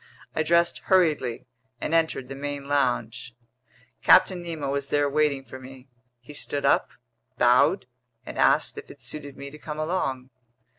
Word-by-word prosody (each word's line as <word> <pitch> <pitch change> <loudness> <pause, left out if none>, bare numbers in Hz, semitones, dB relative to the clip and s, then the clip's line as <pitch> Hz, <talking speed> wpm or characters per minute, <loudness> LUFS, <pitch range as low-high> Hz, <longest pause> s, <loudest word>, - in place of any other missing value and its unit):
I - - +1
dressed 170 +2 +2
hurriedly 155 -10 +2 0.3
and - - -3
entered 160 -6 +1
the 135 - -7
main 145 +1 -5
lounge. 120 -5 -1 0.7
Captain 180 -2 +5
Nemo 160 -5 -4
was 140 0 -2
there 145 0 +2
waiting 140 -2 +1
for 130 - -10
me. 130 0 -13 0.3
He 135 +5 -12
stood 145 0 -2
up, - - +3 0.5
bowed, 125 +10 +4 0.4
and - - -8
asked - - +2
if - - -13
it 140 - -13
suited 140 +2 -7
me 140 0 -8
to 150 - -12
come 150 0 -6
along. 135 -6 -2
140 Hz, 155 wpm, -25 LUFS, 130-155 Hz, 0.7 s, Captain